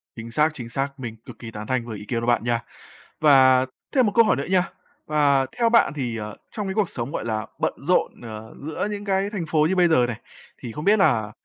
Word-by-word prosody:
Chính 115 0 -8
xác, 150 +5 +3
chính 120 -6 -7
xác, 135 +3 -3
mình 115 -3 -6
cực - - -11
kỳ 115 -2 -8
tán 105 -1 -7
thành 130 -2 -1
với 110 -3 -6
ý 105 - -10
kiến 115 +2 -2
của 115 - -3
bạn 120 -2 +2
nha, 120 -1 +1 0.6
và 130 -3 +6 0.3
thêm 255 -2 +5
một 205 - +1
câu 230 -1 +7
hỏi - - +3
nữa 140 - -3
nha. 185 -2 +2 0.4
Và 145 -3 +3
theo 235 -1 +3
bạn 230 -11 +4
thì, 125 -6 -3
ờ, 105 -1 -6 0.2
trong 210 -3 -4
cái 190 - -2
cuộc 205 -2 +1
sống, 120 +2 -4
gọi - - -4
là, 110 -1 -2
bận - - 0
rộn, 175 +6 0
ờ, 110 -1 -9
giữa 155 +7 -3
những 205 0 -5
cái 195 0 0
thành 200 -5 -4
phố 155 -1 +2
như 190 - +1
bây 180 -2 +5
giờ 125 -7 +4
này, 115 -3 -5 0.4
thì 120 - -7
không 150 +7 -6
biết 210 +1 +5
là 115 - +2
135 Hz, 255 wpm, -23 LUFS, 115-180 Hz, 0.6 s, câu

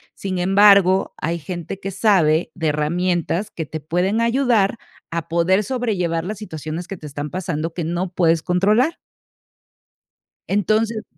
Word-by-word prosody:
Sin 190 -2 -4
embargo, 195 0 +5
hay 170 +2 -2
gente 175 +3 -6
que 195 - -5
sabe 180 -6 +2
de 165 -4 -2
herramientas 175 +5 -1
que 160 -3 -5
te 155 - -5
pueden 180 +8 0
ayudar 235 -3 +2 0.3
a 165 -1 -3
poder 170 +4 +2
sobrellevar 195 -9 -1
las 205 +1 -5
situaciones 160 -3 -6
que 195 - -6
te 155 - -12
están 145 0 -5
pasando 165 -2 -3
que 175 - -3
no 175 +3 -2
puedes 165 -2 +2
controlar. 210 - +2 1.5
Entonces, 215 +3 0
180 Hz, 140 wpm, -21 LUFS, 165-205 Hz, 1.5 s, embargo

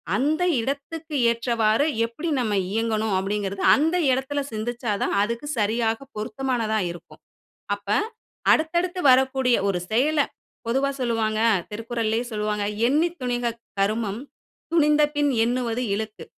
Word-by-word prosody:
அந்த 305 +6 +1 0.2
இடத்துக்கு 295 +4 -4 0.2
ஏற்றவாறு 230 +2 +1 0.2
எப்பிடி 300 +9 -5
நாம் 220 -4 0 0.2
இயங்கணும் 220 -1 0
அப்பிடிங்கிறது 195 0 -2
அந்த 320 +5 +1 0.2
இடத்தில 265 +3 -1
சிந்தித்தா 235 +1 -3
தான் - - 0
அதுக்கு 235 +7 -2
சரியாக 225 +1 +1 0.2
பொருத்தமானதா 225 -1 -1
இருக்கும். 175 - -13 0.6
அப்ப 200 0 -20 0.6
அடுத்தடுத்து 345 +3 +1
வரக்கூடிய 260 -1 +3
ஒரு 180 -2 0
செயல 290 +7 +2 0.5
பொதுவா 270 +3 +1
சொல்லுவாங்க. 225 -3 0 0.3
திருக்குறள்லே 225 +1 -2
சொல்லுவாங்க 210 -1 -1 0.2
"எண்ணித் 330 +6 +1
துணிக 245 -2 -1 0.3
கருமம் 215 +1 0 0.5
துணிந்தபின் 295 -2 +3
எண்ணுவது 245 0 -1
இழுக்கு." 220 0 -5
235 Hz, 110 wpm, -24 LUFS, 215-280 Hz, 0.6 s, வரக்கூடிய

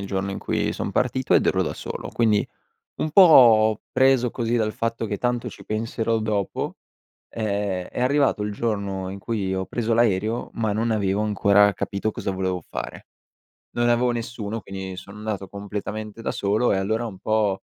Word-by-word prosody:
il 100 - -5
giorno 95 0 -2
in - - -4
cui - - -1
son - - -3
partito, 130 0 +1
ed - - +4
ero - - +2
da - - -2
solo. - - -6
Quindi, 110 -3 +2 0.5
un 155 - -1
po' 115 - +7
preso 130 -2 +4
così 120 -1 -2
dal 110 -2 0
fatto 115 0 -2
che:" 105 - -2
Tanto 120 -1 -1
ci - - -13
penserò 115 +1 -1
dopo," 105 -2 -2 0.5
ehm, 100 -4 -2
è - - -6
arrivato 135 -3 +2
il 105 - -2
giorno 100 -4 -2
in 100 - -6
cui 100 -3 -2
ho 95 0 -2
preso 115 -1 -1
l'aereo, 110 0 +1
ma 110 -2 -1
non 115 +3 0
avevo 100 -1 +1
ancora 100 -1 +4
capito 100 +2 -2
cosa 100 - -4
volevo 95 -2 -2
fare. - - -7 0.7
Non 120 0 +2
avevo 120 +1 +3
nessuno, 115 -2 -4
quindi 95 -2 -7
sono 100 +3 -10
andato 105 -3 -4
completamente 105 +2 -6
da - - -1
solo, 105 +4 +1
e - - +2
allora 110 +5 -1
un 95 -4 -8
po' 105 -2 0
110 Hz, 180 wpm, -24 LUFS, 100-115 Hz, 0.7 s, po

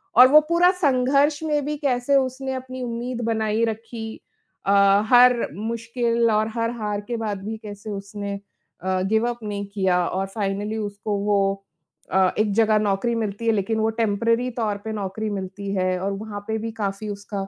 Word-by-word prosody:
और 250 +3 +10
वो 305 - +9
पूरा 345 +1 +5
संघर्ष 285 -3 +2
में 295 -3 0
भी 300 +1 -2
कैसे 275 -1 +1
उसने 265 0 -1
अपनी 255 0 -6
उम्मीद 240 +1 -4
बनाई 220 -1 0
रखी 225 0 -6 0.4
अ, 195 - +2 0.4
हर 245 0 +6
मुश्किल 230 +1 0
और 215 0 +2
हर 230 0 0
हार 210 -1 -2
के 240 - -1
बाद 210 -4 -3
भी 220 +1 -4
कैसे 205 0 -8
उसने 200 0 -5 0.5
अ, 185 0 0
गिव 220 +4 +1
अप 240 0 -5
नहीं 205 -1 -4
किया 185 -3 +2
और 190 +1 -1
फाइनली 205 +1 -3
उसको 205 -1 -3
वो 195 -1 +1 0.5
अ, 190 -1 +4
एक 215 -1 +2
जगह 215 0 +4
नौकरी 210 +3 0
मिलती 220 0 -3
है, - - +5
लेकिन 220 +2 0
वो 220 0 +2
टेम्पररी 230 +3 +1
तौर 220 -4 -2
पे 220 - -3
नौकरी 210 +1 -3
मिलती 195 0 -5
है 185 -1 0
और 195 +1 -1
वहाँ 205 0 -6
पे 220 0 -1
भी 225 +1 -4
काफ़ी 200 +2 -3
उसका 200 -1 -5
220 Hz, 180 wpm, -23 LUFS, 200-240 Hz, 0.5 s, और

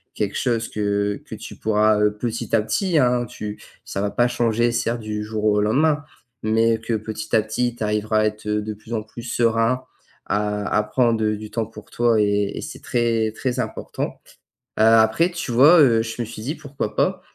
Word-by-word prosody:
quelque 105 -2 -2
chose 115 -3 0
que 100 -1 -1
que - - -8
tu - - -9
pourras, 105 0 +2
heu, 105 0 +2
petit 115 0 -2
à 110 - +4
petit, 165 - 0
hein 125 -3 +3
tu 105 -1 -7 0.2
ça 100 - -4
va 100 - 0
pas 120 +4 +2
changer 120 -1 +1
certes 115 0 -1
du 105 -1 -4
jour 105 0 -4
au 105 -1 +3
lendemain. 145 +8 +2 0.4
Mais 110 +1 +2
que 115 +1 -3
petit 110 0 -3
à 110 - +5
petit, 120 +2 -1
tu 115 - -5
arriveras 105 +1 +1
à - - +2
être, 105 0 -3
heu, 105 0 0
de 110 0 -4
plus 110 +3 -10
en 110 -2 -1
plus 110 +2 -10
serein 115 +1 +1 0.4
à 105 0 -1
à 105 - +4
prendre, 115 +1 +1
heu, 105 0 +1
du 110 0 -9
temps 115 -2 -2
pour 110 -1 -13
toi 120 -2 +2
et 100 -1 +1
et - - -3
c'est - - -8
très 115 -2 0
très 125 +2 -2
important, - - -4 0.6
heu, - - +5
après, 110 +9 +5
tu 170 -7 -4
vois, 145 +9 +7
heu, 115 -5 +5
je 115 +1 -5
me - - -2
suis 110 -1 -9
dit 140 +8 -3
pourquoi 140 -7 -5
pas, - - +1
110 Hz, 210 wpm, -22 LUFS, 105-120 Hz, 0.6 s, vois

